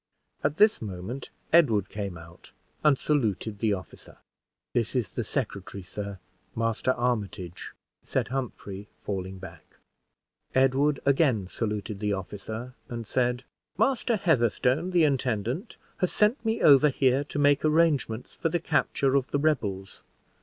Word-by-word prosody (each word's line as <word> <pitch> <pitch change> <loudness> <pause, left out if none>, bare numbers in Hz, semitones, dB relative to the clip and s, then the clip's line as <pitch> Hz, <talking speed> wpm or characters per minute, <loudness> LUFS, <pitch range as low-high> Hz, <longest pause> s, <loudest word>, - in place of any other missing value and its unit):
At 145 +2 0
this 210 +1 +5
moment, 105 +6 -6 0.2
Edward 115 - +5
came 100 -4 -5
out 85 +1 -14 0.3
and 150 -3 +5
saluted 110 -8 0
the 110 -2 +2
officer. 95 -4 -9 0.6
"This 115 +1 0
is 115 -8 -1
the 120 - -2
secretary, 100 -6 -4
sir, 100 +2 -6 0.4
Master 115 +3 +1
Armitage," 105 -8 -3 0.3
said - - -2
Humphrey, 105 -6 -5 0.2
falling 95 -1 -4
back. 85 -4 -12 0.8
Edward 135 +2 +3
again 135 - +3
saluted 105 0 -3
the 105 0 0
officer, 110 +5 -6 0.2
and 115 -1 -5
said 125 +2 0 0.3
"Master 235 +2 +2
Heatherstone, 140 - +2
the 175 -3 +3
intendant, 130 - -1 0.2
has 185 -3 0
sent 215 +4 +2
me 225 0 0
over 145 +1 +7
here 135 0 +2
to 145 - -6
make 145 -1 +4
arrangements 150 -7 +2
for 165 - -1
the 175 +2 0
capture 135 -4 +1
of 135 -2 +2
the - - 0
rebels. 105 -11 -1
125 Hz, 135 wpm, -27 LUFS, 100-145 Hz, 0.8 s, over